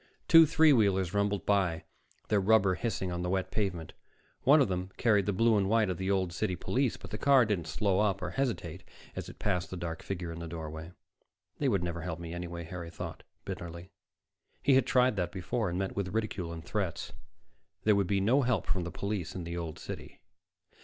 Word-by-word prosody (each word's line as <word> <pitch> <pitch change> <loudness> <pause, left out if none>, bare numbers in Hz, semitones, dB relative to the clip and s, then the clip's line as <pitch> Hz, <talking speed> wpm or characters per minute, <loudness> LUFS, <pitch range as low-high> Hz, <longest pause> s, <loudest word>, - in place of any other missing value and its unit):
Two 165 -1 +8
three 160 -1 +5
wheelers 95 -6 +2
rumbled 100 -1 0
by, 90 -5 +1 0.5
their 105 - +3
rubber 100 -1 +4
hissing 95 -3 -2
on 90 0 -3
the 90 - -2
wet 95 0 -1
pavement. 90 -7 -2 0.5
One 145 +4 +6
of 140 - +4
them 90 0 -3
carried 105 -5 +3
the - - +3
blue 115 +3 +3
and 95 -1 0
white 110 -3 +3
of 90 - -4
the 95 0 -2
Old 95 -3 +1
City 90 +1 -1
police, 125 +7 0
but - - -11
the 105 - -4
car 135 -3 +5
didn't 95 -7 -1
slow 100 +3 +1
up 100 -2 +2
or 90 - -4
hesitate 100 - -2 0.3
as - - -5
it - - -12
passed 90 -3 -1
the 95 - -6
dark 85 -1 -5
figure 90 -3 -4
in 85 - -7
the 85 - -6
doorway. 80 0 -7 0.7
They - - +2
would - - +1
never 85 -1 -3
help 85 -1 -4
me 85 -1 -6
anyway, 85 -1 -5
Harry 85 0 -7
thought 85 - -7 0.2
bitterly. 85 +2 -7 0.7
He 140 - +4
had 130 - +4
tried 125 -3 +3
that 90 -2 -1
before, 100 +3 -2
and 85 - -3
met 95 0 -2
with 100 -2 -1
ridicule 105 -6 -2
and 80 -3 -8
threats. - - -3 0.7
There 105 -1 +4
would 100 -2 +1
be 100 0 +1
no 120 +9 +3
help 120 -7 +1
from 95 -3 -1
the - - -4
police 100 -4 -3
in 90 - -4
the 85 +1 -5
Old 85 -2 -5
City. - - -8
95 Hz, 215 wpm, -30 LUFS, 85-105 Hz, 0.7 s, Two